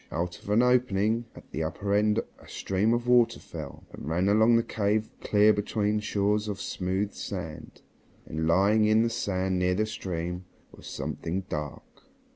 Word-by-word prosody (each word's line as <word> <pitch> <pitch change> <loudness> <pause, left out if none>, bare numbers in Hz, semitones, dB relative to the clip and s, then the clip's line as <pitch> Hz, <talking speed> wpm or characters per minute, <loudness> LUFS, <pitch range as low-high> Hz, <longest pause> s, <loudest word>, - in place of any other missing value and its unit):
Out 85 +2 -3
of - - -11
an 110 +4 +4
opening 120 -2 +2
at - - -14
the 80 - -3
upper 95 +6 -2
end 105 +1 +3 0.2
a - - -16
stream 100 +4 0
of 120 +1 0
water 125 -1 +4
fell, - - -9
and 75 - -7
ran 90 +4 +1
along 110 +3 +5
the 115 - +3
cave 105 0 0
clear 105 +1 +4
between 105 +1 0
shores 105 0 0
of 100 -2 -4
smooth 95 +3 -2
sand. 85 -6 -7 0.4
And, 80 +1 -3
lying 100 +5 +4
on 110 +1 +5
the 115 - 0
sand 95 -3 -1
near 90 0 +2
the 110 +3 +1
stream, 90 -3 -4 0.3
was - - -13
something 90 +4 -4
dark. 75 -2 -4
100 Hz, 170 wpm, -27 LUFS, 90-110 Hz, 0.4 s, along